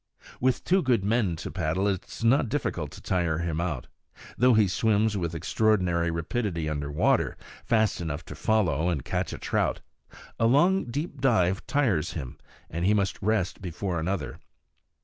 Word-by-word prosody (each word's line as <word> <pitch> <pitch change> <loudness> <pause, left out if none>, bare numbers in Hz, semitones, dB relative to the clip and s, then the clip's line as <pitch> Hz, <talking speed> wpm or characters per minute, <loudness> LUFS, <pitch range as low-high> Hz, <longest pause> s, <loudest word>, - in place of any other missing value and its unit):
With 130 0 +1
two 190 +2 +3
good 120 - +1
men 105 -5 +1
to 80 - -6
paddle, 90 +2 0
it 95 -3 -2
is - - -9
not 120 +1 +3
difficult - - -2
to - - -11
tire 85 -4 0
him 85 -1 -2
out. 75 -8 -3 0.5
Though 125 -1 +4
he 110 -2 +5
swims 110 +2 +1
with 85 -4 -2
extraordinary 90 -1 +1
rapidity 85 0 -2
under 75 -2 -3
water 75 - +1 0.3
fast 110 -4 +1
enough 80 -2 -4
to - - -8
follow 90 -6 +1
and 75 -8 -2
catch - - -2
a - - -5
trout - - -1 0.6
a 115 - +4
long 175 +10 +4
deep 140 +3 -5
dive 95 -8 +2
tires 120 - +1
him, 65 -3 -6 0.3
and 85 +2 -4
he 105 +4 +4
must 100 -2 -1
rest 105 -3 0
before 90 0 -3
another. 95 +4 -3
95 Hz, 170 wpm, -27 LUFS, 85-115 Hz, 0.6 s, he